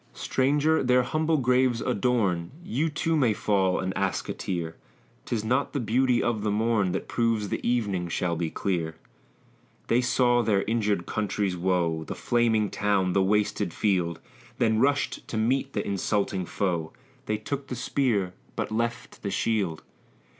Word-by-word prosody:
Stranger, 145 +4 +2
their 125 0 +4
humble 155 +4 +1
graves 125 -2 +2
adorn; 100 -8 0
You 155 +5 0
too 165 +2 0
may 125 -8 +3
fall 95 -3 +1
and 95 +1 -2
ask 95 -1 -1
a - - -1
tear; 85 -3 -4 0.5
'Tis 110 -3 -2
not 125 +5 0
the 145 - 0
beauty 125 +1 +2
of 115 -3 0
the 105 - 0
morn 105 -2 +1
That 95 - -3
proves 115 -3 0
the - - -2
evening 105 -7 0
shall 85 +1 -1
be 85 0 -2
clear 85 -4 -2 0.9
They 120 +2 +4
saw 120 -1 +3
their 105 -4 +2
injured 105 -5 0
country's 105 -3 -1
woe; 85 -3 0
The - - -6
flaming 115 -3 +1
town, 100 -3 +1
the 100 - +3
wasted 100 -3 +1
field; 90 -5 +1 0.4
Then 110 -2 +2
rushed 140 +3 +1
to 110 - -4
meet 135 +5 +1
the - - -2
insulting 100 -1 -1
foe; 85 -5 -2 0.3
They 105 - 0
took 140 +6 -4
the 125 - -4
spear, 115 -7 0 0.2
but - - -3
left 120 +4 -3
the 100 - -3
shield. 100 -6 -1
110 Hz, 160 wpm, -27 LUFS, 95-125 Hz, 0.9 s, their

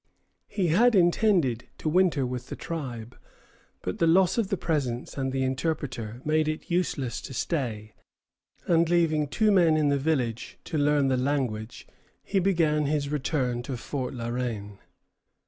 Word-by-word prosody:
He 185 -5 -1
had 230 +8 +4
intended 175 - +2
to - - -5
winter 165 -4 +3
with 125 0 -5
the - - -6
tribe; 125 -7 -6 0.7
but 90 - -4
the 165 - +3
loss 185 +5 +4
of 220 - +1
the 195 - -1
presents 135 -8 -2
and 135 -1 -2
the 135 0 -1
interpreter 130 -4 -3
made 155 0 +2
it 155 +3 -4
useless 140 -9 -1
to 130 - -8
stay, 115 -9 -3 0.7
and 165 -1 +3
leaving 160 -4 +2
two 215 +9 +2
men 170 -5 +4
in 150 -2 +2
the 140 0 +2
village 130 -6 -1
to 155 - -3
learn 145 -1 +3
the 130 - +2
language, 125 -5 -2 0.4
he 200 - 0
began 165 -6 +2
his 145 -1 -1
return 130 -4 -1
to 125 0 -5
Fort 130 +1 -4
La 115 -1 -4
Reine. 110 -5 -4
145 Hz, 160 wpm, -27 LUFS, 125-165 Hz, 0.7 s, had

